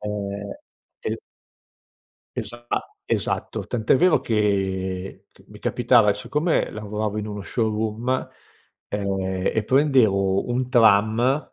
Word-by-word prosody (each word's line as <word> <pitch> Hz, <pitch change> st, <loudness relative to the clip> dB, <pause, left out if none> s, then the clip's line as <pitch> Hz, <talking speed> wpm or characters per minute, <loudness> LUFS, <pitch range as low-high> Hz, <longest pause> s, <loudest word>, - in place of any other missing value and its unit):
ehm, 100 Hz, -1 st, -4 dB, 0.5 s
e -, -, -3 dB, 1.2 s
Esa 120 Hz, 0 st, -6 dB, 0.4 s
esatto, -, -, -2 dB
tant’è 115 Hz, -2 st, +2 dB
vero 180 Hz, +3 st, +4 dB
che 95 Hz, -3 st, -1 dB
c -, -, -22 dB
mi -, -, -14 dB
capitava 120 Hz, -3 st, +4 dB
siccome 150 Hz, -, 0 dB
lavoravo 105 Hz, 0 st, -3 dB
in 105 Hz, 0 st, -4 dB
uno 105 Hz, -1 st, -5 dB
showroom, 110 Hz, +3 st, -1 dB, 0.6 s
e 95 Hz, -2 st, -1 dB
e 110 Hz, -, +1 dB
prendevo 110 Hz, -8 st, +3 dB
un 125 Hz, +1 st, 0 dB
tram, 115 Hz, +4 st, +3 dB
105 Hz, 105 wpm, -23 LUFS, 100-120 Hz, 1.2 s, vero